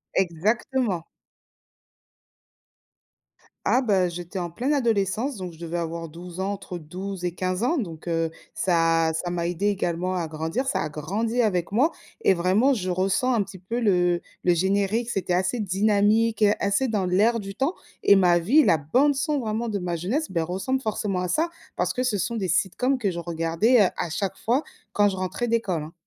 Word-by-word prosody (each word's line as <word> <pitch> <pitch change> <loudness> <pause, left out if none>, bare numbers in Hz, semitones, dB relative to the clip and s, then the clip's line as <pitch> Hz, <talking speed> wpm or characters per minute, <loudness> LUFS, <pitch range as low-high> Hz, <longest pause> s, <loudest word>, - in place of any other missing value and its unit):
Exactement! 195 +3 0 2.6
Ah, 255 - +3
bah, 195 -7 +2
j'étais 175 +2 -6
en 175 -1 -3
pleine 250 - -1
adolescence 230 0 0
donc 185 -3 -6
je 160 - -16
devais 170 0 -4
avoir 165 0 -4
12 170 +3 -10
ans, 195 +2 -1
entre 185 -2 -7
12 180 +3 -6
et 175 - -1
15 185 +3 -2
ans 325 +8 +2
donc, 170 - -5
heu, 165 -1 0 0.2
ça 165 -2 +2
ça 160 +2 -2
m'a 175 -1 -2
aidée 175 +4 -1
également 185 -2 -1
à 170 -3 -1
grandir. 160 - -3
Ça 270 - 0
a - - -2
grandi 205 +11 -1
avec 185 -7 0
moi 275 +10 +3 0.3
et - - +5
vraiment 190 +10 +3
je 185 -7 -2
ressens 190 +8 +1
un 225 -4 +2
petit 195 -1 -11
peu 225 +7 -3
le 180 -5 +2 0.2
le 175 - +4
générique, 200 +6 +1
c'était 185 -5 -1
assez 185 +7 0
dynamique, 210 +2 +2
heu, 205 0 +5
assez 200 +7 +1
dans 210 -5 0
l'air 210 +6 +3
du 195 -1 -8
temps 270 - 0 0.3
et 200 - +7
ma 175 -3 +4
vie, 255 - +4
la 165 - +4
bande 255 - +2
son 290 +1 0
vraiment 225 0 -2
de 205 -2 -2
ma 175 -2 -2
jeunesse, 245 - -2
beh, 170 -3 0
ressemble 190 +11 -2
forcément 210 -4 -2
à 180 - -1
ça, 315 - +1 0.3
parce - - 0
que 255 - -1
ce 240 -5 0
sont 235 +6 -2
des 195 -4 -1
sitcoms 250 +9 +1
que 210 -6 0
je 170 - -5
regardais, 170 +8 +2
heu, - - +2
à 175 - -2
chaque 195 +3 -3
fois 250 +7 +1 0.3
quand 205 0 +4
je 195 - -4
rentrais 185 +6 -2
d'école, 205 -9 0
hein. 155 - -9
195 Hz, 195 wpm, -25 LUFS, 175-230 Hz, 2.6 s, et